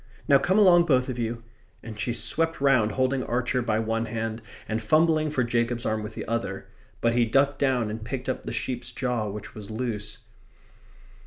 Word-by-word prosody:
Now 140 -3 +6
come 185 +6 +1
along 175 -5 +6
both 130 -5 +2
of 125 -1 -4
you," 115 0 -3 0.4
and 110 -2 -8
she 115 +3 -1
swept 165 +7 0
round, 130 -6 +3
holding 130 0 +1
Archer 125 +1 0
by 110 -3 0
one 115 +1 -1
hand 115 0 -3 0.3
and 110 +1 -2
fumbling 155 +5 +3
for 135 -4 0
Jacob's 120 0 -1
arm 110 0 0
with 105 - -7
the - - -5
other. 115 -4 -3 0.4
But 115 0 +2
he 120 0 +3
ducked 135 +4 +2
down 125 -6 +1
and 110 0 -6
picked 125 +2 -5
up 130 - -2
the - - -6
sheep's 120 +1 -3
jaw, 125 -4 -2
which 105 0 -8
was 105 -2 -9
loose. 110 -2 -4
120 Hz, 190 wpm, -26 LUFS, 110-135 Hz, 0.4 s, Now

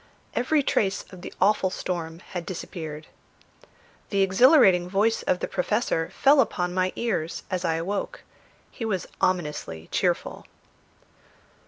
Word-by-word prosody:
Every 285 +4 +2
trace 195 -6 0
of 180 - -10
the - - -7
awful 195 -1 +3
storm 170 -2 -4
had 175 -2 -4
disappeared. 160 -4 -6 1.0
The 200 -2 +2
exhilarating 195 - +5
voice 210 +4 +2
of 180 - 0
the - - -1
Professor 180 -3 0
fell 280 0 +5
upon 180 -7 -1
my 185 0 +1
ears 185 -9 -2
as 185 -1 -1
I 165 - +1
awoke; 200 - -3 0.5
he - - -7
was 200 -5 -1 0.2
ominously 150 - -1
cheerful. - - -1
185 Hz, 130 wpm, -25 LUFS, 170-215 Hz, 1.0 s, exhilarating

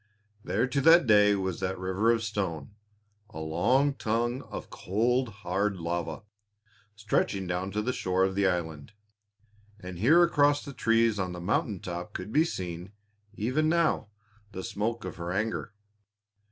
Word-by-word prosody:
There - - 0
to 140 +2 -1
that 165 +2 +7
day 105 -2 +5
was 95 -3 -3
that 95 +1 -2
river 95 +5 +1
of 115 -1 0
stone 95 -9 -3 0.6
a - - -11
long 110 - +2
tongue 120 +1 -1
of - - -7
cold, 120 +6 0
hard 100 -1 -2
lava 85 -2 -3 0.7
stretching 105 -2 -1
down 90 +2 -2
to 105 +2 -2
the 125 +3 -1
shore 95 -3 0
of 95 0 +1
the 100 0 +2
island, 80 -2 -3 0.9
and 90 -2 -8
here 160 - +6
across 145 -3 +3
the 140 - -7
trees 115 -3 +2
on 90 -1 -2
the 90 - -7
mountain 95 +2 -1
top 90 0 -6
could 90 +4 -6
be 155 +2 +4
seen, 90 - -6 0.4
even 130 +10 0
now, 165 -8 +1 0.5
the 95 - -5
smoke 115 +3 -3
of 95 - -6
her 85 0 -4
anger. 110 +3 -2
100 Hz, 155 wpm, -28 LUFS, 90-120 Hz, 0.9 s, that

